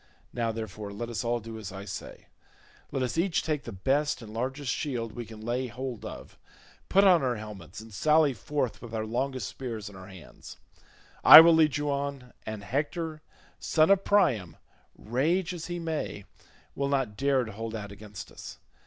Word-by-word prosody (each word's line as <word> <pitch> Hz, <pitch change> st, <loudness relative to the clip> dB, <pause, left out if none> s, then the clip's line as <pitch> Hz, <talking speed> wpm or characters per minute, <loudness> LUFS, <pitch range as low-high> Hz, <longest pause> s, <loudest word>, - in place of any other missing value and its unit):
Now, 115 Hz, -2 st, 0 dB
therefore, 110 Hz, -2 st, -6 dB
let 115 Hz, +4 st, -5 dB
us 120 Hz, +1 st, -3 dB
all 120 Hz, 0 st, 0 dB
do 115 Hz, 0 st, -8 dB
as 105 Hz, -3 st, -7 dB
I 95 Hz, +1 st, -8 dB
say. 95 Hz, -, -8 dB, 0.7 s
Let 135 Hz, -, -1 dB
us 125 Hz, +6 st, -1 dB
each 175 Hz, 0 st, +1 dB
take 150 Hz, -3 st, -2 dB
the 115 Hz, -, -6 dB
best 140 Hz, +9 st, 0 dB
and 110 Hz, -1 st, -10 dB
largest 130 Hz, +3 st, -2 dB
shield 120 Hz, -6 st, -3 dB
we 120 Hz, 0 st, -7 dB
can 110 Hz, -1 st, -11 dB
lay 120 Hz, +3 st, -2 dB
hold 125 Hz, 0 st, -6 dB
of, -, -, -9 dB, 0.5 s
put 195 Hz, +2 st, +5 dB
on 180 Hz, -4 st, +6 dB
our 125 Hz, -2 st, 0 dB
helmets, 105 Hz, -2 st, -9 dB
and 110 Hz, -1 st, -13 dB
sally 150 Hz, +5 st, +4 dB
forth 130 Hz, +2 st, -3 dB
with 115 Hz, -2 st, -7 dB
our 110 Hz, 0 st, -2 dB
longest 125 Hz, 0 st, -2 dB
spears 115 Hz, -5 st, -6 dB
in 100 Hz, -, -14 dB
our 95 Hz, 0 st, -11 dB
hands; 95 Hz, -4 st, -12 dB, 0.7 s
I -, -, +13 dB
will 165 Hz, +1 st, +8 dB
lead 155 Hz, -3 st, +4 dB
you 145 Hz, 0 st, -1 dB
on, 140 Hz, -3 st, -4 dB
and 110 Hz, -2 st, -5 dB
Hector 155 Hz, -, -3 dB, 0.4 s
son 160 Hz, +3 st, +3 dB
of 195 Hz, -1 st, +4 dB
Priam, 120 Hz, -, +2 dB, 0.4 s
rage 165 Hz, -, 0 dB
as 170 Hz, -2 st, -6 dB
he 175 Hz, 0 st, -4 dB
may, 160 Hz, -, -4 dB, 0.5 s
will 140 Hz, 0 st, -1 dB
not 135 Hz, -7 st, 0 dB
dare 135 Hz, +1 st, +2 dB
to 110 Hz, -, -7 dB
hold 115 Hz, +2 st, -5 dB
out 100 Hz, -2 st, -6 dB
against 105 Hz, 0 st, -10 dB
us. -, -, -10 dB
125 Hz, 190 wpm, -28 LUFS, 110-145 Hz, 0.7 s, I